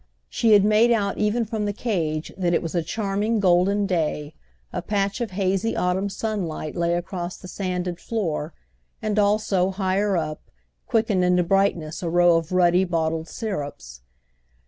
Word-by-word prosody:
She 225 -2 +3
had 205 -1 +6
made 215 +3 +4
out 205 -4 +1
even 220 +3 +1
from 215 -1 -3
the 205 - -1
cage 165 -9 -2
that 175 -2 +1
it - - 0
was 165 - -4
a 175 - +1
charming 205 +5 -1
golden 195 +2 +3
day: 155 -5 -1 0.4
a - - -2
patch 200 +1 -1
of 235 - -1
hazy 195 +3 0
autumn 185 +2 0
sunlight 195 -7 -3
lay 170 -1 +1
across 175 0 -4
the 185 - -11
sanded 180 -2 -3
floor 170 -9 -2 0.5
and 215 -1 -1
also, 200 -3 +2
higher 195 0 0
up, 155 -2 -3 0.5
quickened 220 -5 +2
into 180 0 +3
brightness 175 -3 0
a 170 - -2
row 175 0 +5
of 165 +1 -4
ruddy 180 0 +4
bottled 165 -2 -1
syrups. 145 - -6
185 Hz, 160 wpm, -24 LUFS, 170-205 Hz, 0.5 s, had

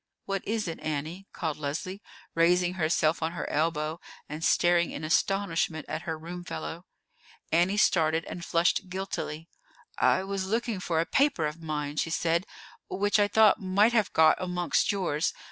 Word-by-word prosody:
"What 195 -1 -2
is 215 -1 -1
it, 165 - -5
Annie?" 155 +6 -4
called 160 -4 -3
Leslie, 160 +7 -4 0.3
raising 175 +2 +3
herself 160 -2 +1
on 160 +1 -1
her - - -4
elbow, 155 +1 -1 0.3
and 155 +2 -6
staring 175 0 +3
in 150 - -6
astonishment 165 -1 0
at 155 +1 -4
her 160 - -2
room 175 +3 -8
fellow. 80 - -6 0.6
Annie 175 +5 +3
started 160 -5 +3
and 175 - -7
flushed 170 +2 +1
guiltily. 180 -4 -4 0.5
"I 185 - +3
was 195 -1 -3
looking 225 -1 -1
for 170 -3 -1
a 165 - +1
paper 270 - +2
of 150 +2 -4
mine," 150 -2 -4
she 165 - 0
said, 170 +3 0 0.4
"which 205 +2 +1
I 205 - +4
thought 215 -1 +4
might 200 +5 +3
have 220 -4 +2
got 160 -1 +4
amongst 180 +1 +1
yours. 180 -5 -1
170 Hz, 160 wpm, -28 LUFS, 160-195 Hz, 0.6 s, I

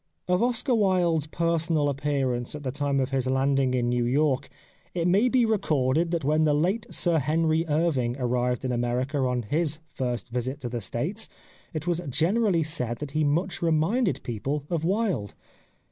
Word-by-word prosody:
Of 180 +1 +2
Oscar 245 +2 +1
Wilde's 180 -8 +2
personal 165 -2 0
appearance 135 -3 -1
at 150 - -7
the 130 - -2
time 140 0 0
of 130 0 -1
his 130 -1 0
landing 135 0 +2
in 120 -1 +1
New 120 0 +1
York 135 +2 +1 0.5
it 170 -1 +1
may 200 +8 +4
be 250 -1 +3
re 220 -2 +2
corded 150 0 +1
that 170 -2 -1
when 155 +3 +2
the 150 -1 +3
late 185 +9 0
Sir 170 -3 +1
Henry 160 +3 +1
Irving 145 -6 +1
ar 130 - -2
rived 125 +1 0
in 130 - 0
America 125 +4 -1
on 125 -2 0
his 150 +6 -1
first 125 -5 -4
visit 125 +3 -3
to 120 - -4
the 120 -1 -4
States 155 - -3 0.4
it 155 -2 -4
was 175 -1 0
generally 175 - +2
said 125 -7 -2
that 145 +2 -6
he 155 +1 +1
much 170 +6 0
reminded 170 +7 +1
people 135 +5 -3
of 165 -2 0
Wilde. 190 - 0
150 Hz, 180 wpm, -26 LUFS, 130-170 Hz, 0.5 s, may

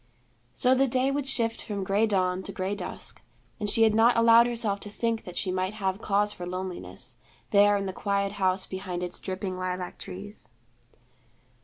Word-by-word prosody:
So 255 - +3
the 270 +1 +3
day 255 +2 +2
would 280 -1 -2
shift 230 -4 0
from 200 -2 -4
gray 200 +4 +2
dawn 185 -3 +1
to - - -6
gray 190 +2 -2
dusk; 205 - -5 0.4
and 210 -2 -1
she 225 - +4
had 220 -1 +5
not 230 +2 +5
allowed 230 +1 +7
herself 230 -4 0
to 205 - -7
think 230 +2 -2
that 180 - -7
she 190 - 0
might 185 +2 -1
have 195 -1 -2
cause 205 +1 +2
for 175 - -7
loneliness, 185 0 -5 0.3
there 205 0 +5
in 200 - -2
the 190 - -3
quiet 200 0 -1
house 190 -1 +1
behind 185 -2 -5
its 180 0 -4
dripping 185 0 -4
lilac 185 0 -4
trees. 195 +2 -9
200 Hz, 185 wpm, -27 LUFS, 185-225 Hz, 0.4 s, allowed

